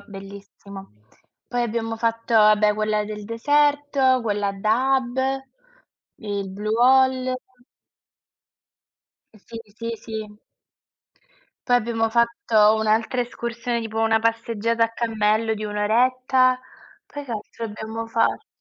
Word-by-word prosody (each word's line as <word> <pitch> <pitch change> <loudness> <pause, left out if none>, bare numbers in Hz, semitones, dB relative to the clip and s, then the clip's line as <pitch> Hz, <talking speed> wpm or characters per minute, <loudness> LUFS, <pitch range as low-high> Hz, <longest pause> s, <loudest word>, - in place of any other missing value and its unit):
bellissimo. 195 - -12 0.5
Poi 245 -1 -1
abbiamo 225 -1 -2
fatto, 230 0 -1
vabbè, 210 -1 +5
quella 215 0 0
del 210 0 -7
deserto, 285 +2 +2
quella 205 -2 -1
a - - -2
Dahab, 250 +4 +1 1.0
il 200 -2 -4
Blue 215 +3 -2
Hole 260 0 +3 2.0
Uhm, - - -17
sì, 230 -1 -9 0.2
sì, 230 0 -4
sì. 220 -2 -7 1.3
Poi 245 - +4
abbiamo 225 -1 0
fatto 235 - +3
un'altra 220 +3 +1
escursione, 235 0 -3
tipo 225 -1 -4
una 225 0 +3
passeggiata 230 0 0
a 230 - -4
cammello 220 -1 0
di 215 - -7
un'oretta. 255 +5 +2 0.5
Poi 290 0 -8
che 260 - -11
altro 225 +1 -6
abbiamo 220 +1 -6
fatto? 225 0 0
225 Hz, 115 wpm, -23 LUFS, 215-245 Hz, 2.0 s, vabbè